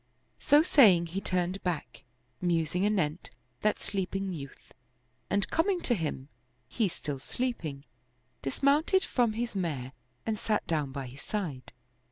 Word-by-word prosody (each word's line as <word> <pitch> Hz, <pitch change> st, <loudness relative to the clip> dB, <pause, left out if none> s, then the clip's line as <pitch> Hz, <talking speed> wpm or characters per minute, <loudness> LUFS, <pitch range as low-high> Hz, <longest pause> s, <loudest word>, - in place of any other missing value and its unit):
" -, -, -42 dB
So 295 Hz, +1 st, +8 dB
saying 205 Hz, -, +6 dB
he 195 Hz, -, -1 dB
turned 185 Hz, 0 st, -1 dB
back^ 175 Hz, -5 st, -3 dB, 0.4 s
musing 175 Hz, +1 st, +1 dB
anent 180 Hz, -6 st, 0 dB, 0.3 s
that 210 Hz, 0 st, +2 dB
sleeping 195 Hz, -1 st, -2 dB
youth, 140 Hz, -5 st, -9 dB, 0.6 s
and 200 Hz, -1 st, +1 dB
coming 360 Hz, +3 st, +2 dB
to 245 Hz, -, +3 dB
him, 150 Hz, -, -3 dB, 0.4 s
he 220 Hz, -, +1 dB
still 145 Hz, -5 st, -5 dB
sleeping, 155 Hz, -, -3 dB, 0.6 s
dismounted 285 Hz, -, +3 dB
from 240 Hz, -4 st, +2 dB
his 235 Hz, 0 st, -3 dB
mare 145 Hz, -9 st, -2 dB, 0.3 s
and 220 Hz, -2 st, -1 dB
sat 215 Hz, -1 st, 0 dB
down 150 Hz, -4 st, -1 dB
by 135 Hz, 0 st, -4 dB
his 130 Hz, +3 st, -10 dB
side. 155 Hz, -, -4 dB
185 Hz, 140 wpm, -30 LUFS, 150-220 Hz, 0.6 s, So